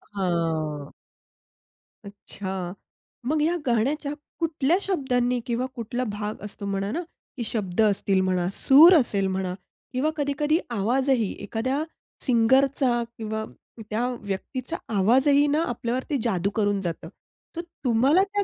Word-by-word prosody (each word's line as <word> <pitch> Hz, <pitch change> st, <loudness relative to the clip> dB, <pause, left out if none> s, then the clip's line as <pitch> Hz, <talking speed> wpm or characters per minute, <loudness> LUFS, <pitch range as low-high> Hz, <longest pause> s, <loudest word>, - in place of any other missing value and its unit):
हां. 160 Hz, -5 st, -1 dB, 1.1 s
अच्छा. 190 Hz, -2 st, -5 dB, 0.5 s
मग 300 Hz, +4 st, +1 dB
ह्या 330 Hz, +3 st, +2 dB
गाण्याच्या 275 Hz, +5 st, 0 dB, 0.3 s
कुठल्या 325 Hz, 0 st, +1 dB
शब्दांनी 250 Hz, -9 st, 0 dB
किंवा 245 Hz, +1 st, -1 dB
कुठला 240 Hz, +1 st, -3 dB
भाग 210 Hz, 0 st, -4 dB
असतो 205 Hz, 0 st, -7 dB
म्हणा 195 Hz, 0 st, -2 dB
ना, 330 Hz, -, -2 dB, 0.4 s
की 235 Hz, -, -2 dB
शब्द 210 Hz, -3 st, -1 dB
असतील 200 Hz, -2 st, +2 dB
म्हणा, 185 Hz, -2 st, +1 dB
सूर 310 Hz, +7 st, +8 dB
असेल 200 Hz, -9 st, +2 dB
म्हणा, 190 Hz, -1 st, -2 dB, 0.4 s
किंवा 275 Hz, +5 st, +1 dB
कधी-कधी 295 Hz, +2 st, +1 dB
आवाजही, 240 Hz, +1 st, +1 dB
एखाद्या 260 Hz, +8 st, -1 dB, 0.4 s
सिंगरचा 255 Hz, 0 st, +3 dB
किंवा 220 Hz, 0 st, -3 dB, 0.4 s
त्या 230 Hz, +3 st, 0 dB
व्यक्तीचा 250 Hz, -, -4 dB, 0.2 s
आवाजही 265 Hz, +8 st, +4 dB
ना 295 Hz, +3 st, +2 dB
आपल्यावरती 245 Hz, +4 st, -2 dB
जादू 195 Hz, -4 st, +1 dB
करून 205 Hz, -2 st, +1 dB
जातं. 165 Hz, -2 st, -4 dB, 0.5 s
तर 340 Hz, -, -2 dB, 0.2 s
तुम्हाला 260 Hz, +10 st, +4 dB
त्या 405 Hz, +1 st, -1 dB
235 Hz, 120 wpm, -25 LUFS, 200-275 Hz, 1.1 s, सूर